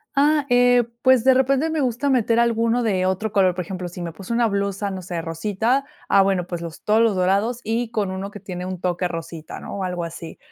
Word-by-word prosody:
Ah, 295 +1 +3
eh, 245 0 +5 0.2
pues, 260 -3 +5
de 265 +1 +6
repente 270 +4 +2
me 315 -1 0
gusta 260 +2 0
meter 235 -2 +2
alguno 230 0 +2
de 190 -4 +1
otro 190 +3 -1
color. 190 -3 +3
Por 180 - -3
ejemplo, 185 -1 -5
si 175 +1 -9
me 170 - -4
puse 180 +6 -9
una 235 0 +2
blusa, 200 0 -2
no 190 -1 -5
sé, 175 -1 -4
rosita, 210 +11 0 0.2
ah, 195 - +5
bueno, 190 -2 +1
pues 175 -1 -5
los 165 -1 -8
todos 215 +2 +3
los 225 -3 +3
dorados 200 +6 +1
y 225 +2 -1
con 210 -4 -1
1 190 +1 -4
que 205 - -10
tiene 180 -1 -6
un 185 -1 -5
toque 180 0 -1
rosita, 165 -2 -7
¿no?, - - -7
o 195 - -3
algo 180 -2 -3
así. 165 0 -8
200 Hz, 235 wpm, -22 LUFS, 180-240 Hz, 0.2 s, de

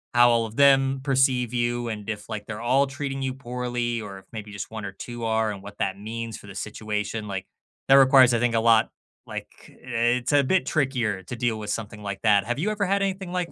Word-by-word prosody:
how 120 0 +7
all 115 -1 +2
of 110 - -12
them 135 -1 +4
perceive 130 -3 +2
you 120 0 0
and 105 -1 -6
if, 105 -1 -5
like, 105 -2 -5
they're 105 -1 -5
all 135 +4 +3
treating 135 0 -4
you 130 -1 -1
poorly. 120 -2 -3
Or 100 -2 -8
if - - -21
maybe 110 -2 -7
just 100 +1 -7
1 110 -1 -6
or 100 - -5
2 120 +4 -8
are 110 -1 +1
and 100 -2 -7
what 100 +1 -10
that 95 0 -1
means 115 +1 -5
for - - -14
the 95 - -10
situation, 105 +1 -4
like, 95 -2 -4 0.4
that - - +8
requires, 130 -2 +7
I 115 - +2
think, 120 -1 +1
a - - +4
lot 115 -1 +4 0.4
like, - - -6 0.3
it's 120 +1 0
a 145 -1 +5
bit 185 +7 +2
trickier 125 - 0
to 120 - -6
deal 115 -2 -1
with 105 -1 -6
something 105 -1 -4
like 100 -1 -4
that. 105 -3 +4
Have 120 +1 -1
you 205 +7 0
ever 210 -1 -1
had 200 +1 +1
anything 190 -2 -3
like 180 -1 -2
120 Hz, 235 wpm, -25 LUFS, 105-135 Hz, 0.4 s, that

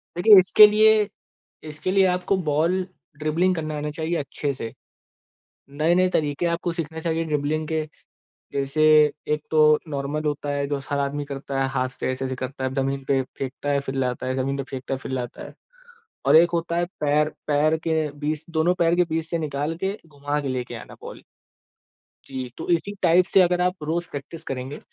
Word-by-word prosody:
देखिए 205 +3 +8
इसके 200 +3 +8
लिए 215 0 +4 0.6
इसके 155 +4 -4
लिए 195 -1 +5
आपको 180 +2 +1
बॉल 175 +5 +1 0.3
ड्रिबलिंग 165 +5 +1
करना 155 -2 -4
आना 150 0 -3
चाहिए 160 +3 -2
अच्छे 140 0 -3
से। 115 -3 -6 1.0
नए-नए 170 +6 +2
तरीके 150 0 -1
आपको 170 +1 -2
सीखना 160 -1 -5
चाहिए 165 0 -1
ड्रिबलिंग 150 +1 -1
के, 160 0 -1 0.7
जैसे 140 +3 0 0.5
एक 150 - -1
तो 155 -1 +5
नॉर्मल 145 +1 -3
होता 145 -1 -2
है 140 0 -1
जो 145 - -1
हर 145 - 0
आदमी 140 +1 -2
करता 135 -1 -4
है 135 - 0
हाथ 130 0 -1
से 130 - -4
ऐसे-ऐसे 130 0 -3
करता 130 +1 -5
है 130 0 -2
जमीन 135 0 -1
पे 135 -1 +3 0.2
फेंकता 135 +2 -4
है 140 0 +2
फिर 135 - -2
लाता 130 -1 -2
है 130 - -1
जमीन 135 +1 -1
पे 140 - -2
फेंकता 135 0 -4
है, 130 - -4
फिर 130 - -7
लाता 125 -2 -4
है। - - -11 0.7
और - - +6
एक 170 +2 +6
होता 170 0 -1
है 175 - +2 0.2
पैर 150 +1 +2 0.2
पैर 150 +2 +2
के 160 -2 +1
बीच 150 +1 -2
दोनों 165 +2 +2
पैर 170 -1 +2
के 180 - +4
बीच 160 0 -1
से 170 - 0
निकाल 150 +1 -2
के 195 +2 -1
घुमा 145 0 -3
के 140 - -4
लेके 125 -1 -3
आना - - -9
बॉल। - - -10 1.0
जी, 130 -2 -6
तो - - -6
इसी 175 +4 0
टाइप 180 +1 +5
से 190 - +7
अगर 180 0 +2
आप 180 -3 -1
रोज़ 170 +3 -2
प्रैक्टिस 145 +3 -8
करेंगे, 135 +2 -5
150 Hz, 195 wpm, -24 LUFS, 140-170 Hz, 1.0 s, देखिए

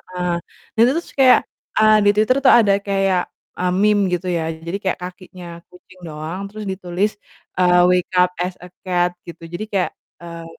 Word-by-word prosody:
heeh, 180 -1 -4 0.5
dan 225 - +1
itu 250 - +3
terus 340 - -8
kayak, 260 -1 +7 0.4
eee, 215 0 +6
di - - +7
Twitter 220 +5 +3
tuh 260 - +7
ada 200 -3 +3
kayak, 195 -2 +1 0.4
e - - -3 0.2
meme, 210 -1 +3
gitu 180 +1 -4
ya. 170 -2 -1 0.2
Jadi 180 +4 -3
kayak, 190 - -1
kakinya 180 0 -10 0.2
kucing 180 +1 -19
doang, 155 +4 -6
terus 215 +1 -8
ditulis, 190 +2 -2 0.5
eee, 180 -1 +4
wake 180 -1 +1
up 180 0 +4
as 180 - -4
a 180 - -10 0.2
cat, 180 -1 +1 0.2
gitu. 170 - -10
Jadi 175 +5 -4
kayak, 190 -2 0 0.3
eee 170 -1 -9
185 Hz, 180 wpm, -20 LUFS, 180-205 Hz, 0.5 s, kayak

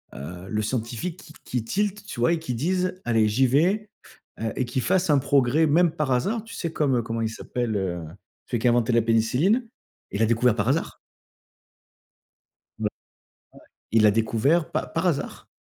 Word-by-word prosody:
heu, 90 +7 -8
le 105 -1 -1
scientifique 120 - -3
qui 155 - -14
qui 125 -3 -2
tilt 205 - -1
tu 205 - -7
vois 145 +8 +3
et 170 - -1
qui 160 -6 -4
dise: 180 +8 0
«Allez 115 -2 +3
j'y 115 +6 +3
vais» 185 - +2 0.5
heu 110 0 -2
et 130 - 0
qui 125 +2 -2
fasse 185 +4 +1
un 145 - +5
progrès 140 +2 +3
même 165 +3 +4
par 150 -3 -2
hasard, 205 - 0
tu 225 - -12
sais, 170 - -3
comme, 145 -5 +1
heu, - - +1
comment 115 0 -3
il 110 - 0
s'appelle, 115 0 -3
heu, 90 -3 -2 0.5
celui 120 - -1
qui 125 - +1
a - - +6
inventé 120 0 +2
la 115 - +4
pénicilline. 125 - +2 0.4
Il 100 - -3
l'a - - +5
découvert, 115 0 +3
par 110 +1 0
hasard. 150 +5 -1 1.8
B - - -5
ouais. - - +3 1.0
Il 115 -1 +4
l'a 105 - +7
découvert 115 +9 +1
pa - - -1
par - - -1
hasard. - - -3
125 Hz, 190 wpm, -25 LUFS, 115-165 Hz, 1.8 s, l'a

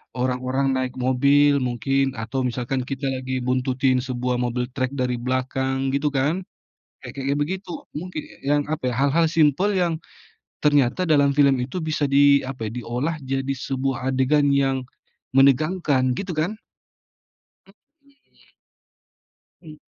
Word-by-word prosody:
orang-orang 130 +2 0
naik 130 -1 -2
mobil 140 +3 +3
mungkin, 135 +2 0
atau 120 +4 -3
misalkan 125 +2 -2
kita 135 0 -3
lagi 130 -1 -3
buntutin 130 0 +1
sebuah 125 -1 -2
mobil 125 0 -1
trek 130 0 -2
dari 125 -2 -1
belakang, 130 +1 -1
gitu 140 +2 0
kan. 145 +7 +1 0.7
Kayak-kayak 140 +1 -3
begitu. 185 +5 -3 0.3
Mungkin 165 -1 -5
e - - -16
yang 145 0 +3
apa 150 -5 -1
ya, - - -3
hal-hal 140 +4 +3
simpel 165 +5 +3
yang 170 -2 +1 0.7
ternyata 145 +4 +2
dalam 140 -2 +4
film 140 -2 +5
itu 135 +9 -4
bisa 155 -2 -1
di 140 0 +5
apa 130 -4 -5
ya, - - -4
diolah 135 +7 -2
jadi 135 +1 -2 0.2
sebuah 135 -1 -1
adegan 140 +2 +2
yang 135 -1 +1 0.5
menegangkan, 140 -1 +3
gitu 195 -2 -4
kan? 165 +7 0 1.2
Mhm. 280 +6 -28 1.1
Mmm. 155 -3 -13
135 Hz, 130 wpm, -23 LUFS, 130-150 Hz, 1.2 s, film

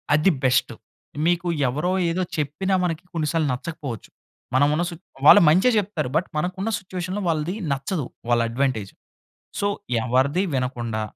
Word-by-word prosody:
అది 155 +6 +4
బెస్టు 130 -1 +2 0.5
మీకు 175 0 +1 0.2
ఎవరో, 150 +8 -1 0.2
ఏదో 175 +3 -1 0.2
చెప్పిన 155 +6 -2
మనకి 170 -1 -2
కొన్ని 160 -3 -1
సార్లు 165 -3 +1
నచ్చకపోవచ్చు. 135 -3 -6 0.5
మనం 145 +2 +5
ఉన్న 170 - +1
సుచ్ 170 -1 -10 0.2
వాళ్ళు - - +10
మంచే 185 +10 +5
చెప్తారు 185 -9 -1
బట్, 175 - +1
మనకు 180 +4 -1
ఉన్న 225 - -1
సిట్యుయేషన్‌లో 185 +1 -5
వాళ్ళది 165 +3 -1 0.2
నచ్చదు. 140 +3 -2 0.2
వాళ్ళ 120 -1 +3
అడ్వాంటేజ్. 115 -5 -1 0.7
సో, 200 - +1 0.4
ఎవరిది 130 +8 +2
వినకుండా, 120 -4 -2
155 Hz, 145 wpm, -23 LUFS, 130-180 Hz, 0.7 s, వాళ్ళు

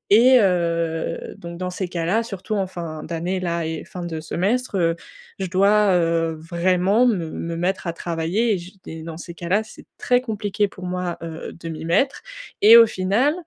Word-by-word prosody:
Et 255 +3 +7
heu, 170 -4 0 0.2
donc, 170 0 -8
dans 180 0 -3
ces 180 0 -3
cas-là, 175 +6 0
surtout 215 -1 -5
en 195 -2 0
fin 165 -4 -6
d'année 175 +3 -3
là 170 -2 -2
et 160 0 -4
fin 180 -1 -7
de 160 -2 -4
semestre, 200 +8 -1
heu, 165 -1 +2 0.4
je 190 - -2
dois, 200 +2 +4
heu, 165 -1 +1
vraiment 180 +7 +2
me 175 -9 0
me 165 0 -4
mettre 180 +1 -1
à 170 - -1
travailler. 175 +7 0
Et - - 0
j 185 +3 -13
et 160 0 -7
dans 160 0 -7
ces 170 0 -8
cas-là, 180 +5 0
c'est 220 - -14
très 250 0 +2
compliqué 210 -3 -1
pour 185 -1 -12
moi, 180 -1 -3
heu, 165 -1 -6
de 165 - -6
m'y 160 0 -6
mettre 265 +12 +1 0.4
et 225 +3 +10
au 230 - +9
final 215 +9 +1
180 Hz, 190 wpm, -22 LUFS, 165-205 Hz, 0.4 s, et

